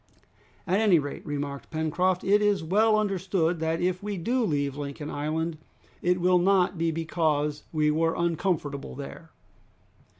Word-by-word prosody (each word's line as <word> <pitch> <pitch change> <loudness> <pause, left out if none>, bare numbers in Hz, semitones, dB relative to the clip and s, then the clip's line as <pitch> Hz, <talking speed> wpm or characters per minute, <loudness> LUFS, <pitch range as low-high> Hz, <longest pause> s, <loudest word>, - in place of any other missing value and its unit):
"At 190 +2 +2
any 210 -6 +5
rate," 145 -2 -4
remarked 140 -1 -4
Pencroft, 170 +3 0
"it 205 +2 +4
is 205 -4 +2
well 215 +6 +3
understood 185 -5 0
that 160 +1 -1
if 180 0 0
we 205 -1 -4
do 240 +9 0
leave 145 -7 0
Lincoln 145 +1 -6
Island, 155 +2 -2 0.4
it 180 +1 +2
will 180 0 +4
not 185 0 +3
be 165 0 0
because 155 -2 -1
we 150 -1 +2
were 165 +1 +1
uncomfortable 165 -5 -1
there!" 145 +4 -9
165 Hz, 145 wpm, -27 LUFS, 150-185 Hz, 0.4 s, any